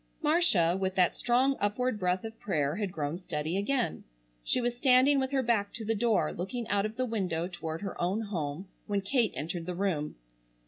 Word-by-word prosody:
Marcia, 295 - +4
with 190 0 -1
that 180 -2 +3
strong 255 +3 +2
upward 210 +3 0
breath 180 0 0
of 225 0 -8
prayer 150 -5 -1
had 205 -3 -2
grown 155 0 -3
steady 160 -2 -3
again. 200 - 0 0.4
She - - +2
was 240 0 -1
standing 260 +2 +5
with 265 0 0
her 270 -1 +1
back 220 -4 +1
to 225 - -4
the 225 - +1
door 215 -7 +1
looking 220 +7 -4
out 205 +1 +2
of 215 - -10
the 255 +1 0
window 185 -8 -1
toward 165 -1 -6
her 195 - -5
own 190 +5 0
home 175 -4 -4 0.2
when 200 -1 0
Kate 225 +2 +1
entered 165 +4 -4
the 180 - -3
room. 175 -6 -1
200 Hz, 195 wpm, -30 LUFS, 175-240 Hz, 0.4 s, standing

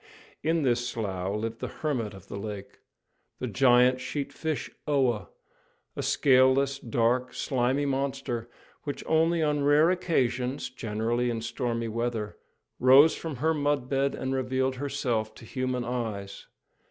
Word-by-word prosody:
In 160 0 +1
this 120 -2 +1
slough 100 -4 -3
lived 115 +1 -3
the - - -3
hermit 120 -10 -3
of 95 0 -14
the 100 - -6
lake, 100 -1 -7 0.6
the - - -4
giant 125 +1 +4
sheat 140 +2 -4
fish 160 -2 -3 0.2
Oa, 130 - +1 0.7
a - - -3
scaleless, 135 +1 +3
dark, 120 +2 0
slimy 130 +2 0
monster, 135 -4 -2 0.3
which 145 - -5
only 165 +1 +2
on 150 -1 +1
rare 150 +4 +5
occasions, 130 -8 -1
generally 115 +1 -1
in 115 -1 -2
stormy 115 0 -2
weather, 115 -2 -2 0.4
rose 135 +5 +7
from 160 -3 -5
her 160 +6 +1
mudbed 140 -2 0
and 130 0 -3
revealed 130 0 0
herself 125 -6 -2
to - - -12
human 130 +1 -2
eyes. 110 -5 -4
125 Hz, 135 wpm, -28 LUFS, 115-140 Hz, 0.7 s, rose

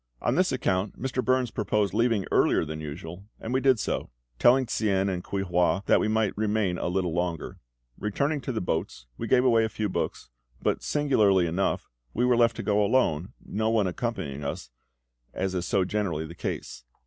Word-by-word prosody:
On - - 0
this - - +2
account 95 +2 -1
Mr. 130 0 -2
Burns 130 -1 +1
proposed 105 -2 0
leaving 115 -3 +2
earlier - - +3
than 80 0 -6
usual, 80 +5 -7
and 115 - -4
we 130 - +2
did 130 -4 +4
so, - - -2 0.3
telling 130 +2 +5
Tsien 100 -4 +1
and 90 -1 -4
Kuei 100 -1 -2
hua 90 +1 +1
that - - +4
they - - +1
might 110 -1 +1
remain 105 -4 0
a - - -2
little 90 -1 -1
longer. 85 -1 -3 0.4
Returning 140 +8 -1
to 130 - -3
the 115 - -2
boats, 80 -8 -3
we - - -3
gave 125 0 +4
away 115 -3 +5
a 110 - 0
few 105 0 -2
books; - - -3 0.3
but, - - 0
singularly 110 -11 +3
enough, 85 +4 -1 0.3
were 125 +1 +3
left 115 -1 +3
to - - -5
go 105 0 +2
alone, 95 -7 +1
no 110 +2 -1
one 110 -3 +2
accompanying 90 - -3
us, - - -5 0.6
as 95 0 -1
is 90 -2 -2
so 95 -2 +2
generally 90 -6 -1
the 80 - -9
case. 65 - -5
100 Hz, 190 wpm, -27 LUFS, 90-115 Hz, 0.6 s, telling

